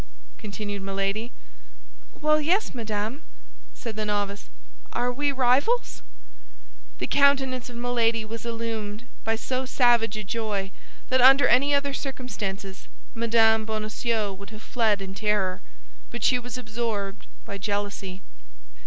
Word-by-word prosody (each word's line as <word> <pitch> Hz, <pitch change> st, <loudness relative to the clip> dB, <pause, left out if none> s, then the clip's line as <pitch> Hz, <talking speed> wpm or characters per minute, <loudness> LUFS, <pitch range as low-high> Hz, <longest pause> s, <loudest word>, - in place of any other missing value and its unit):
continued 205 Hz, -1 st, -5 dB
Milady. 195 Hz, +4 st, -2 dB, 0.9 s
"Well, 305 Hz, 0 st, +3 dB
yes, 365 Hz, +8 st, +2 dB
madame," 220 Hz, +3 st, -3 dB, 0.5 s
said 230 Hz, -3 st, -6 dB
the 215 Hz, -, -2 dB
novice, 205 Hz, -1 st, -2 dB, 0.4 s
"Are 245 Hz, 0 st, +1 dB
we 290 Hz, +2 st, +1 dB
rivals?" 270 Hz, -, +2 dB, 1.0 s
The -, -, -2 dB
countenance 270 Hz, -3 st, +3 dB
of 245 Hz, -, -10 dB
Milady 235 Hz, -2 st, +1 dB
was 225 Hz, +1 st, -6 dB
illumined 225 Hz, -2 st, -4 dB, 0.2 s
by 225 Hz, 0 st, +1 dB
so 255 Hz, +3 st, -2 dB
savage 235 Hz, -4 st, +3 dB
a 215 Hz, -, -3 dB
joy 205 Hz, -2 st, -2 dB, 0.4 s
that 255 Hz, 0 st, +4 dB
under 270 Hz, +2 st, +8 dB
any 280 Hz, +4 st, +5 dB
other 280 Hz, 0 st, 0 dB
circumstances 205 Hz, -9 st, -5 dB, 0.3 s
Mme. 225 Hz, -1 st, +4 dB
Bonacieux 215 Hz, 0 st, -1 dB
would 200 Hz, +1 st, -10 dB
have 215 Hz, 0 st, -11 dB
fled 215 Hz, -5 st, +1 dB
in 190 Hz, 0 st, -6 dB
terror; 200 Hz, -3 st, 0 dB, 0.5 s
but -, -, -6 dB
she 250 Hz, -, +4 dB
was 245 Hz, 0 st, -6 dB
absorbed 215 Hz, -4 st, -3 dB, 0.2 s
by 200 Hz, -, -6 dB
jealousy. 200 Hz, -2 st, -3 dB
225 Hz, 125 wpm, -26 LUFS, 205-250 Hz, 1.0 s, under